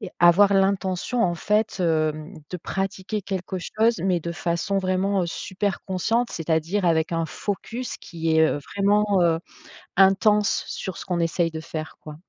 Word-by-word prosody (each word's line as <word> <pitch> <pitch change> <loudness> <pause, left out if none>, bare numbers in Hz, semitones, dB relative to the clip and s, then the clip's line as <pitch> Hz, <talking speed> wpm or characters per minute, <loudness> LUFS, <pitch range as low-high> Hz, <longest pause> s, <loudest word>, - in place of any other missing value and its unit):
et 200 -4 -7
avoir 195 +4 +6
l'intention, 195 +4 +1
en 175 -1 +1
fait, 210 +2 0
hem, 155 -2 0 0.2
de 180 - -3
pratiquer 195 +4 -3
quelque 190 -1 -4
chose 220 +5 +1
mais 180 -3 +2
de 170 +1 -4
façon, 170 +5 -1
vraiment, 190 +1 +1
heu, - - -1
super 190 +1 -3
consciente, 225 +6 0
c'est-à-dire 165 +4 -1
avec 160 -1 +2
un 165 0 0
focus 225 +7 -5
qui 165 -2 -2
est, 160 - +6
heu, - - -1 0.2
vraiment, 200 0 +3
heu, 165 -1 +2 0.6
intense 200 +2 +4
sur 190 - -5
ce - - -7
qu'on 180 -2 -2
essaye 165 0 +1
de 160 - -6
faire, 155 -1 -6
quoi. 155 - -9
185 Hz, 165 wpm, -24 LUFS, 165-200 Hz, 0.6 s, avoir